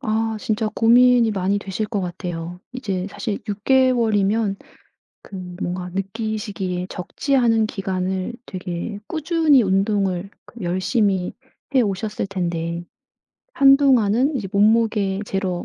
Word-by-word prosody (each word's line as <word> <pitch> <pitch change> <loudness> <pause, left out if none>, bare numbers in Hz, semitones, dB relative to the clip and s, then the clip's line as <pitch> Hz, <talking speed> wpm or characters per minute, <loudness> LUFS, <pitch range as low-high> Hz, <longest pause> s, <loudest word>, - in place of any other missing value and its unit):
아. 220 +1 0
진짜 215 0 -1
고민이 240 0 +5
많이 195 +1 0
되실 200 +2 -3
것 210 -2 -2
같아요. 175 -1 -5
이제 195 -7 -3
사실 215 -2 -4
6 205 0 -4
개월이면 225 -6 +2 0.7
그 200 - -11 0.3
뭔가 180 0 -3
느끼시기에 195 -2 -3
적지 270 +9 -2
않은 225 -3 +3
기간을 190 -1 -3
되게 185 +2 -5
꾸준히 315 -4 +3
운동을 195 -1 0 0.3
열심히 185 +1 0 0.4
해 260 - +5
오셨을 205 0 -2
텐데 170 -3 -3 0.7
한동안은 270 -1 +4
이제 200 -5 -4
몸무게 210 -2 +2
재러 190 -3 -2
205 Hz, 250 characters per minute, -21 LUFS, 185-230 Hz, 0.7 s, 고민이